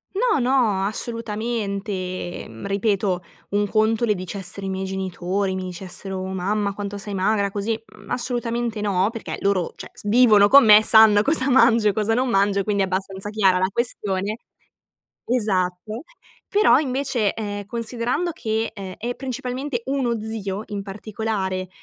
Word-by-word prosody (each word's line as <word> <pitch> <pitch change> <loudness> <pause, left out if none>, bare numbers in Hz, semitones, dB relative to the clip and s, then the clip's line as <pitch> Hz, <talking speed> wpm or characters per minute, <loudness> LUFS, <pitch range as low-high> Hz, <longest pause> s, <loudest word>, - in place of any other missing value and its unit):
No, 445 -1 +2
no, 240 -6 +2
assolutamente, 210 -5 -3
mhmm, 110 - -8
ripeto, 200 -2 0 0.3
un 205 +1 +1
conto 220 +2 +2
le 215 - +2
dicessero 185 +1 -5
i 195 - -3
miei 190 0 -3
genitori, 190 0 -2
mi 185 - -4
dicessero: 185 +1 -5
"Mamma, 200 +2 -1
quanto 205 0 -5
sei 200 0 -5
magra 200 +1 +1
così"; 210 +3 -2
mhmm, - - -14
assolutamente 240 -2 -2
no, 200 -1 +1
perché 230 -2 -6
loro 195 -3 +1
cioè, - - -9
s - - -10
vivono 210 -3 +6
con 280 0 +8
me, 210 0 +8
sanno 220 -2 +7
cosa 280 +1 +2
mangio 230 -4 +5
e 205 - +3
cosa 215 +2 0
non 255 +2 +1
mangio 200 -1 +2
e - - 0
quindi 200 -1 +1
è - - +2
abbastanza 190 +1 -3
chiara 195 -4 +3
la 185 +1 +1
questione 210 -3 -2 0.9
esatto, 210 -1 -1 0.5
però 420 +2 +5
invece, 260 -6 -1
ehm, 205 -2 -5
considerando 240 - -2
che, 225 -7 -2
ehm, 190 -3 -7
è 240 +2 -3
principalmente 255 0 -4
uno 260 -4 0
zio, 210 -2 -4
in 205 -1 -3
particolare, 195 -2 -3
210 Hz, 155 wpm, -22 LUFS, 195-230 Hz, 0.9 s, con